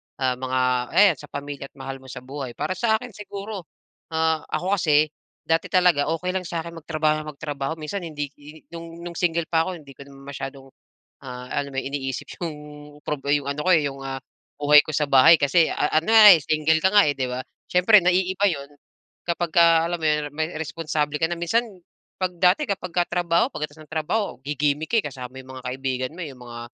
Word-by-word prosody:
ah, 130 Hz, -1 st, 0 dB
mga 130 Hz, 0 st, -1 dB, 0.4 s
ayan, 195 Hz, -4 st, +6 dB
sa 150 Hz, -, -11 dB
pamilya 140 Hz, -1 st, -6 dB
at -, -, -47 dB
mahal 135 Hz, -1 st, -7 dB
mo 130 Hz, -, -16 dB
sa 125 Hz, 0 st, -9 dB
buhay. 135 Hz, -2 st, -7 dB
Para -, -, -3 dB
sa 220 Hz, +4 st, +1 dB
akin 245 Hz, +2 st, -5 dB
siguro, 200 Hz, -2 st, -8 dB, 0.5 s
ah, 160 Hz, -1 st, 0 dB
ako 185 Hz, +6 st, -1 dB
kasi 150 Hz, -2 st, +3 dB, 0.3 s
dati 165 Hz, 0 st, 0 dB
talaga 180 Hz, -6 st, +3 dB
okey 165 Hz, +3 st, -1 dB
lang 185 Hz, -1 st, -3 dB
sa'kin 170 Hz, 0 st, -4 dB
magtrabaho 155 Hz, -1 st, 0 dB
nang 150 Hz, -1 st, -8 dB
magtrabaho. 145 Hz, +1 st, -4 dB
Minsan 170 Hz, +4 st, -5 dB
hindi 145 Hz, -3 st, -5 dB
hi 150 Hz, +2 st, -14 dB
no'ng 170 Hz, 0 st, -9 dB
no'ng 175 Hz, -1 st, -7 dB
single 170 Hz, -1 st, +1 dB
pa 165 Hz, +1 st, +2 dB
ako 185 Hz, -, -4 dB
hindi 150 Hz, -5 st, -13 dB
ko 140 Hz, +1 st, -13 dB
masyadong, 135 Hz, -1 st, -9 dB, 0.5 s
ah, 125 Hz, -1 st, -8 dB
alam 140 Hz, +2 st, -3 dB
mo 135 Hz, -, -2 dB
yon? 140 Hz, +1 st, -4 dB
Iniisip 135 Hz, -3 st, -4 dB, 0.2 s
'yong 165 Hz, -3 st, -3 dB, 0.5 s
prob 150 Hz, -3 st, -3 dB
'yong 145 Hz, -1 st, +1 dB
ano 140 Hz, +1 st, -3 dB
ko, 185 Hz, -, +3 dB
eh, 155 Hz, -5 st, +4 dB
'yong, 135 Hz, -1 st, -8 dB
ah, 135 Hz, 0 st, -4 dB, 0.4 s
buhay 150 Hz, 0 st, +7 dB
ko 155 Hz, -, -6 dB
sa 150 Hz, 0 st, 0 dB
bahay 145 Hz, +4 st, +7 dB
kasi 155 Hz, +4 st, +3 dB
a 150 Hz, -, -1 dB
ano 220 Hz, -, -1 dB
nga, 215 Hz, -4 st, +10 dB
eh, 160 Hz, -, -3 dB
single 155 Hz, +1 st, +2 dB
ka 190 Hz, -, +4 dB
nga, 205 Hz, -5 st, +6 dB
eh, 145 Hz, -, +1 dB
'di 130 Hz, -2 st, -2 dB
ba? 125 Hz, -, -3 dB, 0.3 s
Siyempre 185 Hz, +2 st, +6 dB
naiiba 185 Hz, +2 st, +2 dB
'yon 140 Hz, -3 st, -6 dB, 0.6 s
kapag 170 Hz, -1 st, -2 dB
alam 170 Hz, 0 st, +5 dB
mo 160 Hz, -, -5 dB
'yon, 150 Hz, -1 st, +1 dB
may 160 Hz, +2 st, -2 dB
responsable 155 Hz, -2 st, -2 dB
ka 160 Hz, -, +1 dB
na. 170 Hz, -, -2 dB
Minsan 175 Hz, +8 st, +1 dB, 0.6 s
'pag 185 Hz, -, +1 dB
dati 185 Hz, -, +3 dB
kapagka 185 Hz, -3 st, -1 dB
trabaho 175 Hz, +2 st, +2 dB
pagkatapos 150 Hz, -, -6 dB
ng 155 Hz, -, -22 dB
trabaho 170 Hz, +8 st, 0 dB, 0.2 s
gigimik 150 Hz, +1 st, 0 dB
ka, -, -, +5 dB
eh, -, -, -30 dB
kasama 125 Hz, -1 st, -9 dB
mo -, -, -11 dB
'yong 130 Hz, -, -18 dB
mga 130 Hz, -, -10 dB
kaibigan 130 Hz, 0 st, -3 dB
mo, 180 Hz, -, -12 dB
eh, 165 Hz, -, -4 dB
yung 125 Hz, -, -17 dB
mga, 120 Hz, 0 st, -8 dB
155 Hz, 215 wpm, -23 LUFS, 140-175 Hz, 0.6 s, nga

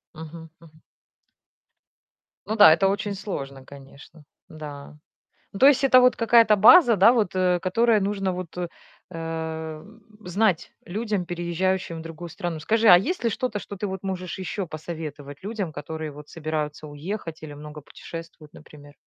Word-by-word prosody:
Мгм, 160 Hz, +1 st, -10 dB
мгм. 155 Hz, -1 st, -19 dB, 1.7 s
Ну 220 Hz, -, -1 dB
да, 205 Hz, -7 st, +9 dB
это 195 Hz, +4 st, +3 dB
очень 200 Hz, +1 st, -2 dB
сложно, 140 Hz, -10 st, -6 dB
конечно, 140 Hz, +3 st, -15 dB, 0.3 s
да. 150 Hz, -2 st, -10 dB, 0.6 s
Ну, 195 Hz, -, -7 dB
то 270 Hz, -, +7 dB
есть 280 Hz, -2 st, +4 dB
это 255 Hz, -2 st, +7 dB
вот 250 Hz, 0 st, +4 dB
какая-то 230 Hz, -2 st, +5 dB
база, 235 Hz, -, +7 dB
да, 200 Hz, +5 st, +7 dB
вот, 210 Hz, -6 st, +1 dB
э, 180 Hz, -1 st, +2 dB
которая 215 Hz, +4 st, +2 dB
нужно 195 Hz, -1 st, -1 dB
вот, 180 Hz, -2 st, -6 dB, 0.6 s
э, 160 Hz, -1 st, -5 dB, 0.4 s
знать 185 Hz, -1 st, 0 dB
людям, 205 Hz, 0 st, -3 dB
переезжающим 175 Hz, 0 st, -2 dB
в -, -, -7 dB
другую 165 Hz, +1 st, -9 dB
страну. 175 Hz, -2 st, -5 dB
Скажи, 225 Hz, +7 st, +1 dB
а 175 Hz, -, +10 dB
есть 310 Hz, -, -2 dB
ли 230 Hz, -, +2 dB
что-то, 215 Hz, -1 st, -3 dB
что 200 Hz, -, -9 dB
ты 205 Hz, -, -3 dB
вот 190 Hz, 0 st, -6 dB
можешь 185 Hz, -2 st, -4 dB
ещё 185 Hz, 0 st, -4 dB
посоветовать 155 Hz, -3 st, -8 dB
людям, 200 Hz, -6 st, -4 dB
которые 155 Hz, +1 st, -6 dB
вот 150 Hz, +1 st, -12 dB
собираются 155 Hz, -1 st, -4 dB
уехать 160 Hz, +2 st, -6 dB
или 150 Hz, -, -8 dB
много 150 Hz, +1 st, -10 dB
путешествуют, 165 Hz, 0 st, -11 dB
например? 145 Hz, -1 st, -15 dB
175 Hz, 155 wpm, -24 LUFS, 155-205 Hz, 1.7 s, а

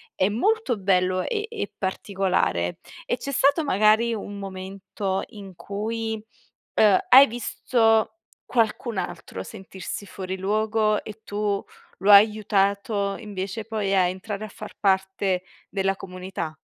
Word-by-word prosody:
è 190 Hz, +2 st, +2 dB
molto 265 Hz, -, +1 dB
bello 185 Hz, -1 st, +2 dB
e 425 Hz, -, -2 dB
e 455 Hz, -3 st, -4 dB
particolare. 190 Hz, -, -1 dB, 0.3 s
E 245 Hz, -, -1 dB
c'è 280 Hz, -, -5 dB
stato 285 Hz, +4 st, +3 dB
magari 220 Hz, 0 st, +3 dB
un 205 Hz, -1 st, -6 dB
momento 195 Hz, 0 st, -4 dB
in 195 Hz, -4 st, -11 dB
cui, 220 Hz, +2 st, -4 dB, 0.5 s
uhm, 205 Hz, -3 st, +6 dB
hai 270 Hz, +2 st, +10 dB
visto 225 Hz, -1 st, +1 dB, 0.4 s
qualcun 230 Hz, -2 st, 0 dB
altro -, -, -6 dB
sentirsi 195 Hz, -1 st, -7 dB
fuori 190 Hz, -1 st, -6 dB
luogo 215 Hz, +2 st, +1 dB
e 215 Hz, 0 st, -10 dB
tu 205 Hz, -1 st, -1 dB, 0.4 s
lo 200 Hz, +2 st, +4 dB
hai 205 Hz, +2 st, +9 dB
aiutato, 200 Hz, -1 st, 0 dB
invece 205 Hz, 0 st, -5 dB
poi 210 Hz, -3 st, -1 dB
a 180 Hz, -2 st, +4 dB
entrare 200 Hz, +3 st, -5 dB
a -, -, -7 dB
far -, -, -10 dB
parte 190 Hz, -1 st, +1 dB, 0.3 s
della 195 Hz, 0 st, 0 dB
comunità? 180 Hz, -4 st, -6 dB
200 Hz, 130 wpm, -24 LUFS, 190-220 Hz, 0.5 s, hai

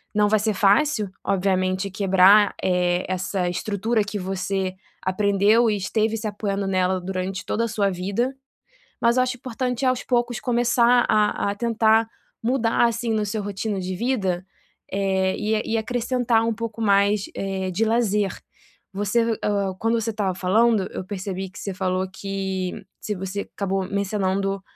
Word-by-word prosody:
Não 210 Hz, 0 st, +4 dB
vai 215 Hz, +1 st, +3 dB
ser 215 Hz, 0 st, 0 dB
fácil, 210 Hz, +4 st, +3 dB, 0.2 s
obviamente, 185 Hz, 0 st, 0 dB
quebrar, 195 Hz, +1 st, +5 dB
eh, 180 Hz, -1 st, +1 dB
essa 185 Hz, 0 st, -1 dB
estrutura 210 Hz, +5 st, 0 dB
que 205 Hz, +1 st, -5 dB
você 190 Hz, 0 st, -2 dB, 0.3 s
aprendeu 200 Hz, +4 st, +3 dB
e 210 Hz, -, +1 dB
esteve 220 Hz, +3 st, 0 dB
se 220 Hz, -, -6 dB
apoiando 205 Hz, -1 st, -2 dB
nela 185 Hz, -1 st, +1 dB
durante 185 Hz, 0 st, -4 dB
toda 230 Hz, +4 st, 0 dB
a -, -, -2 dB
sua 205 Hz, -3 st, 0 dB
vida, 200 Hz, +9 st, -2 dB, 0.7 s
mas 235 Hz, +1 st, +3 dB
eu 255 Hz, -, +5 dB
acho 255 Hz, 0 st, -2 dB
importante, 250 Hz, +1 st, -3 dB
aos 255 Hz, -1 st, +1 dB
poucos, 240 Hz, -2 st, 0 dB
começar 240 Hz, 0 st, +3 dB
a 210 Hz, -1 st, +2 dB
a -, -, -5 dB
tentar 225 Hz, 0 st, +2 dB, 0.4 s
mudar, 235 Hz, -1 st, +2 dB
assim, 235 Hz, 0 st, -2 dB
no 215 Hz, -1 st, 0 dB
seu 210 Hz, +1 st, -2 dB
rotina 205 Hz, 0 st, -3 dB
de 185 Hz, 0 st, -3 dB
vida, 190 Hz, -6 st, -1 dB, 0.5 s
eh, 190 Hz, -1 st, +1 dB
e 215 Hz, +1 st, -1 dB
e -, -, +2 dB
acrescentar 240 Hz, 0 st, +1 dB
um 230 Hz, -, +1 dB
pouco 230 Hz, 0 st, -5 dB
mais, 200 Hz, -1 st, +3 dB
eh, 190 Hz, -1 st, -3 dB
de 210 Hz, +5 st, +1 dB
lazer. 210 Hz, -4 st, +1 dB, 0.6 s
Você 205 Hz, +4 st, 0 dB, 0.2 s
o 200 Hz, -2 st, 0 dB
quando 225 Hz, +2 st, +1 dB
você 225 Hz, +1 st, -1 dB
estava 200 Hz, -4 st, -1 dB
falando, 205 Hz, +2 st, +2 dB
eu -, -, -5 dB
percebi 190 Hz, -1 st, -5 dB
que 190 Hz, -, -12 dB
você 200 Hz, -, -4 dB
falou 185 Hz, 0 st, -1 dB
que 190 Hz, -1 st, -3 dB, 0.3 s
se 210 Hz, -, -3 dB
você 190 Hz, +2 st, -4 dB
acabou 195 Hz, -1 st, -1 dB
mencionando 195 Hz, -1 st, -1 dB
200 Hz, 160 wpm, -23 LUFS, 190-225 Hz, 0.7 s, quebrar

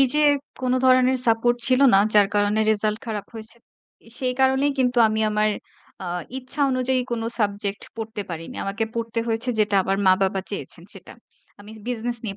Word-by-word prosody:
এই -, -, +7 dB
যে 300 Hz, -, +3 dB, 0.4 s
কোন 255 Hz, -1 st, 0 dB
ধরনের 255 Hz, 0 st, +4 dB
সাপোর্ট 235 Hz, +1 st, +2 dB
ছিল 255 Hz, 0 st, +3 dB
না। -, -, +7 dB, 0.2 s
যার 205 Hz, -1 st, +6 dB
কারণে 205 Hz, +1 st, +2 dB
রেজাল্ট 215 Hz, 0 st, 0 dB
খারাপ 210 Hz, -3 st, -4 dB
হইছে। 225 Hz, +1 st, -9 dB, 0.5 s
এ -, -, -15 dB
সেই 255 Hz, -1 st, 0 dB
কারণেই 265 Hz, +2 st, +3 dB
কিন্তু 250 Hz, -1 st, +1 dB
আমি 215 Hz, 0 st, -1 dB
আমার 210 Hz, 0 st, +1 dB, 0.5 s
আ 185 Hz, -, -5 dB, 0.3 s
ইচ্ছা 265 Hz, +3 st, -6 dB
অনুযায়ী 255 Hz, 0 st, +1 dB
কোন 235 Hz, -1 st, -2 dB, 0.2 s
সাবজেক্ট 200 Hz, -1 st, -1 dB
পড়তে 220 Hz, -2 st, -5 dB
পারিনি। 165 Hz, -1 st, -7 dB
আমাকে 200 Hz, +3 st, -2 dB
পড়তে 230 Hz, 0 st, -3 dB
হয়েছে 225 Hz, +2 st, -2 dB
যেটা 210 Hz, -1 st, +1 dB
আমার 195 Hz, +1 st, -1 dB
মা-বাবা 190 Hz, +1 st, +3 dB
চেয়েছেন 180 Hz, -4 st, -6 dB
সেটা। 195 Hz, -, -12 dB, 0.5 s
আমি 205 Hz, +1 st, -12 dB, 0.2 s
বিজনেস 240 Hz, 0 st, -3 dB
নিয়ে 200 Hz, -3 st, -4 dB
225 Hz, 175 wpm, -23 LUFS, 205-250 Hz, 0.5 s, এই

